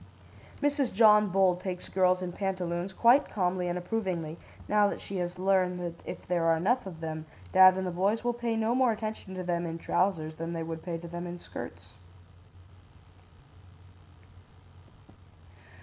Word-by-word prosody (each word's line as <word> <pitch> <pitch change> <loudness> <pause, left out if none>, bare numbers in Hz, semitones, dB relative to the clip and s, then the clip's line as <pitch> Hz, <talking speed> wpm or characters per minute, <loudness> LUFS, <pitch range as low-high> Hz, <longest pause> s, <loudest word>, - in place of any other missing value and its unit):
"Mrs. 285 -3 +1
John 210 0 +6
Bull 185 -1 +3
takes 180 0 -6
girls 185 -1 +2
in 180 - -4
pantaloons 180 -1 -3
quite 240 +8 +4
calmly 180 -2 -1
and 175 0 -1
approvingly, 180 -5 -3 0.3
now 210 0 +4
that - - -5
she 195 - -6
has 175 0 -3
learned 185 -1 +1
that 170 -1 -6
if - - -7
there 175 -2 0
are 165 0 +4
enough 210 +7 +1
of 165 -3 -9
them, 160 -1 -5 0.3
dad 185 0 +8
and 190 - -2
the 180 - -2
boys 195 +6 0
will 240 0 +1
pay 235 -1 -2
no 225 +1 +1
more 255 -1 +3
attention 215 -3 -5
to 185 - -4
them 175 -1 -1
in 165 0 -4
trousers 165 -3 -1
than 165 +1 -4
they 165 -1 -3
would 160 0 -5
pay 170 -1 -4
to 170 +1 -9
them 175 +1 -6
in 175 0 -6
skirts." - - -9
185 Hz, 165 wpm, -29 LUFS, 175-205 Hz, 0.3 s, dad